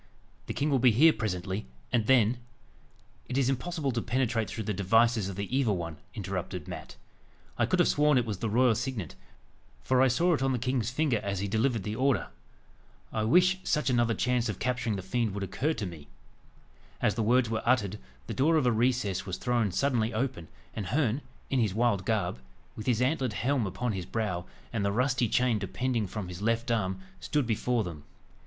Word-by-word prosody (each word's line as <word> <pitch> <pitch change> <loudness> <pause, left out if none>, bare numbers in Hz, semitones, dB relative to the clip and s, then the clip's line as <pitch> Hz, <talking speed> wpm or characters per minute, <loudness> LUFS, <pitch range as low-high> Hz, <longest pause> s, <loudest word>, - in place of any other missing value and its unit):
The - - -4
king 145 +1 0
will 135 - +3
be 125 +1 +6
here 150 +8 +6
presently, 95 - -3 0.2
and 115 -3 +1
then 120 -2 +4 0.4
" - - -32
"It 125 - -1
is 135 -2 +2
impossible 145 +1 -2
to 120 -1 -1
penetrate 120 -2 0
through 110 - -4
the 105 - -2
devices 110 +2 +3
of 95 - -6
the 100 +6 -3
evil 120 -8 +2
one," 85 -3 -5 0.2
interrupted 95 -4 -4
Mat. - - -8 0.6
"I - - +1
could - - +1
have - - +4
sworn 150 -1 +3
it 125 - +2
was 105 -5 -4
the 115 - -1
royal 120 +2 +4
signet, 115 - -3 0.7
for 130 -1 +3
I 130 - +6
saw 170 +8 +3
it 150 - 0
on 135 0 +2
the - - +1
king's 125 -2 -1
finger 130 -3 +1
as 100 -1 -2
he 100 - -2
delivered 115 +1 +1
the 105 +3 -3
order. 130 +2 +1 0.8
I 110 -1 0
wish 180 +9 +4
such 150 -4 +1
another 120 -2 +2
chance 125 -2 +1
of 100 - -3
capturing 125 -3 -1
the 95 - -5
fiend 110 +1 -1
would 100 - -3
occur 130 - -1
to 105 - -3
me." 80 -5 -9 0.9
As - - +2
the 115 - -2
words 120 +1 +3
were 110 - -1
uttered, 105 -5 +1 0.3
the - - -5
door 155 +5 +3
of 150 - +2
a 125 - +4
recess 115 -5 0
was 90 - -3
thrown 120 -5 0
suddenly 120 -1 0
open, 125 -8 -2 0.3
and 105 -4 -4
Herne, 130 - +1 0.3
in 135 - +2
his 105 -5 +1
wild 110 -5 +1
garb, 110 - 0 0.4
with 110 - -7
his 125 -1 +2
antlered 130 -3 0
helm 125 -1 0
upon 110 +6 -2
his 95 -4 -4
brow, 95 -6 -2 0.3
and 110 -3 -1
the 100 - +1
rusty 125 +1 +1
chain 125 -2 +2
depending 110 +3 -1
from 100 0 -5
his 90 +1 -8
left 115 +2 0
arm, 105 - -1 0.2
stood 150 -5 0
before 115 +1 0
them. 80 -6 -7
115 Hz, 205 wpm, -29 LUFS, 100-130 Hz, 0.9 s, be